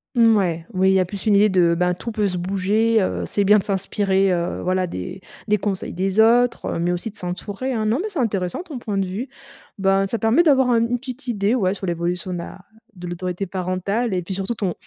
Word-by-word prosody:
Mmh, 230 Hz, -2 st, +5 dB
ouais, 170 Hz, -4 st, -1 dB
oui, 190 Hz, 0 st, +3 dB
il -, -, +3 dB
y 190 Hz, -, +4 dB
a 185 Hz, -, +2 dB
plus 195 Hz, +3 st, -8 dB
une 210 Hz, -, +5 dB
idée 210 Hz, +2 st, +5 dB
de: 175 Hz, -3 st, +3 dB
«Ben, 180 Hz, 0 st, +2 dB
tout 205 Hz, +6 st, -6 dB
peut 215 Hz, -2 st, 0 dB
se 180 Hz, -2 st, -3 dB
bouger», 200 Hz, +5 st, +1 dB
heu, 185 Hz, -, -1 dB
c'est 205 Hz, -, 0 dB
bien 210 Hz, +2 st, +6 dB
de -, -, -4 dB
s'inspirer, 195 Hz, -1 st, +1 dB
heu 170 Hz, -1 st, -2 dB
voilà, 185 Hz, 0 st, 0 dB
des 170 Hz, -, -6 dB, 0.3 s
des 210 Hz, 0 st, +3 dB
conseils 195 Hz, -1 st, -3 dB
des 190 Hz, +3 st, -1 dB
autres, 235 Hz, +2 st, +4 dB
heu, -, -, -2 dB
mais 175 Hz, +1 st, +1 dB
aussi 180 Hz, +5 st, -3 dB
de 215 Hz, -, -20 dB
s'entourer, 200 Hz, +8 st, -4 dB
hein. 220 Hz, -2 st, -1 dB
Non, 220 Hz, +5 st, +1 dB
mais 430 Hz, -, -3 dB
c'est 370 Hz, -8 st, -4 dB
intéressant 200 Hz, -, -1 dB
ton 300 Hz, -8 st, -7 dB
point 210 Hz, -4 st, -3 dB
de 195 Hz, -, +1 dB
vue. 205 Hz, +8 st, -5 dB, 0.5 s
Ben, 195 Hz, 0 st, +2 dB
ça 230 Hz, -, -2 dB
permet 225 Hz, +8 st, +3 dB
d'avoir 265 Hz, -5 st, +4 dB
un 235 Hz, -, +4 dB
une 235 Hz, +2 st, 0 dB
petite 255 Hz, +1 st, -8 dB
idée, 210 Hz, -2 st, +1 dB
ouais, 195 Hz, -7 st, +1 dB
sur 195 Hz, -, -6 dB
l'évolution 175 Hz, +1 st, -2 dB
de -, -, -3 dB
la 170 Hz, -, -8 dB, 0.4 s
de 180 Hz, -1 st, -9 dB
l'autorité 180 Hz, +2 st, -4 dB
parentale 190 Hz, +5 st, -2 dB
et 180 Hz, -, -1 dB
puis 190 Hz, -, -5 dB
surtout 195 Hz, +5 st, -3 dB
ton 195 Hz, -5 st, -2 dB
195 Hz, 245 wpm, -22 LUFS, 185-225 Hz, 0.5 s, bien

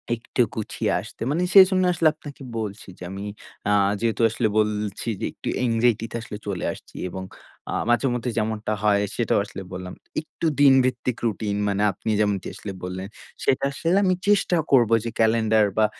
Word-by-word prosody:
একটু 115 Hz, +2 st, -2 dB
গুছিয়ে 110 Hz, -, -2 dB
আসতে। -, -, -13 dB
মানে 165 Hz, -, 0 dB
সেজন্য 190 Hz, -1 st, +7 dB
আসলে 165 Hz, -1 st, +3 dB
আপনাকে 145 Hz, -2 st, -12 dB, 0.2 s
বলছি 105 Hz, -2 st, -5 dB
যে -, -, -10 dB
আমি 100 Hz, +1 st, -6 dB, 0.5 s
আ -, -, +3 dB, 0.3 s
যেহেতু 115 Hz, 0 st, 0 dB
আসলে 115 Hz, +1 st, 0 dB
বলছি 105 Hz, 0 st, -1 dB
যে -, -, 0 dB
একটু -, -, -10 dB, 0.2 s
অ্যানজাইটি 115 Hz, -1 st, +2 dB
তে -, -, -6 dB
আসলে 105 Hz, -2 st, -7 dB
চলে 95 Hz, -3 st, -2 dB
আসছি -, -, -16 dB
এবং 95 Hz, +1 st, -6 dB, 0.5 s
আ -, -, -2 dB, 0.2 s
মাঝে 120 Hz, +3 st, +3 dB
মধ্যে 125 Hz, 0 st, -2 dB
যেমনটা 110 Hz, 0 st, -1 dB
হয় 100 Hz, -1 st, +4 dB
সেটাও 120 Hz, -3 st, +1 dB
আসলে 100 Hz, -, -8 dB
বললাম। 90 Hz, 0 st, -6 dB, 0.3 s
একটু 160 Hz, -, -7 dB
দিন 140 Hz, -2 st, +7 dB
ভিত্তিক 125 Hz, -1 st, -1 dB
রুটিন 105 Hz, -2 st, -1 dB
মানে 100 Hz, 0 st, 0 dB
আপনি 110 Hz, +3 st, -4 dB
যেমনটি 105 Hz, -3 st, 0 dB
আসলে 100 Hz, -, -6 dB
বললেন, 90 Hz, +1 st, -5 dB, 0.4 s
সেটা 130 Hz, -, +2 dB
আসলে 165 Hz, +6 st, +1 dB
আমি 185 Hz, -1 st, +3 dB
চেষ্টা 200 Hz, -3 st, +3 dB
করব 120 Hz, -5 st, +5 dB
যে 115 Hz, -, -2 dB
ক্যালেন্ডার 110 Hz, -1 st, +4 dB
বা 110 Hz, -, +5 dB
110 Hz, 175 wpm, -24 LUFS, 105-130 Hz, 0.5 s, সেজন্য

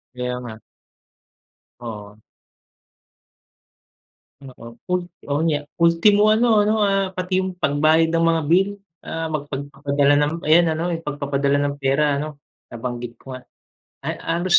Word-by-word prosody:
Kaya 125 Hz, 0 st, -3 dB
nga. 120 Hz, -3 st, -8 dB, 1.2 s
Oo. 105 Hz, -3 st, -8 dB, 2.3 s
Oo, 125 Hz, -3 st, -11 dB, 0.2 s
ul 180 Hz, -, +3 dB, 0.3 s
oo, 145 Hz, -, +1 dB
niya 145 Hz, -2 st, 0 dB, 0.2 s
ultimo 200 Hz, +6 st, +4 dB
ano, 220 Hz, 0 st, +4 dB
ano, 215 Hz, -, +3 dB
ah, 195 Hz, -1 st, +2 dB
pati 185 Hz, 0 st, -1 dB
yung 185 Hz, -1 st, -3 dB
pagbayad 155 Hz, +1 st, +2 dB
ng 165 Hz, 0 st, +2 dB
mga 165 Hz, -1 st, +1 dB
bill, 190 Hz, +3 st, +4 dB, 0.3 s
ah, 165 Hz, 0 st, -4 dB
magpad 145 Hz, -1 st, -5 dB
padala 140 Hz, 0 st, +1 dB
ng 145 Hz, +2 st, +1 dB
ayan 165 Hz, +2 st, +5 dB
ano, 160 Hz, -, -3 dB, 0.2 s
pagpapadala 140 Hz, -1 st, 0 dB
ng 140 Hz, 0 st, -1 dB
pera 140 Hz, +1 st, +1 dB
ano, 150 Hz, 0 st, -5 dB, 0.3 s
nabanggit 120 Hz, 0 st, -6 dB
ko 135 Hz, -, -13 dB
nga. 130 Hz, -1 st, -9 dB, 0.6 s
Ay -, -, -4 dB
halos 175 Hz, +2 st, +2 dB
150 Hz, 130 wpm, -21 LUFS, 135-175 Hz, 2.3 s, ayan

